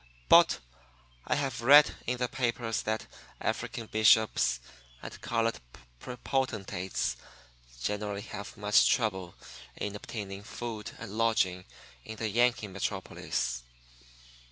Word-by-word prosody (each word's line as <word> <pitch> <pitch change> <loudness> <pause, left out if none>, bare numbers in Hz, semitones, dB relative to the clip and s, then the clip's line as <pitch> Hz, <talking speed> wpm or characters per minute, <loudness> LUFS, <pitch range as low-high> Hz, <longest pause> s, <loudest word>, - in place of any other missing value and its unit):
But - - +7 0.7
I - - +2
have 135 -4 -2
read 145 +5 +8
in 125 +1 0
the 125 0 0
papers 120 -2 -1
that 110 0 -2 0.3
African 115 - -3
bishops 110 - +4 0.4
and - - -8
colored 115 -1 0 0.6
potentates 100 -8 -1 0.6
generally 105 - -2
have 100 -1 -8
much 105 0 +4
trouble 95 -7 0 0.4
in 105 0 -3
obtaining 100 -2 -6
food 110 0 -6
and 115 -4 -8
lodging 95 -6 +2 0.4
in 110 - -7
the 110 0 -2
Yankee 120 0 +2
metropolis. - - -3
110 Hz, 105 wpm, -30 LUFS, 100-120 Hz, 0.7 s, read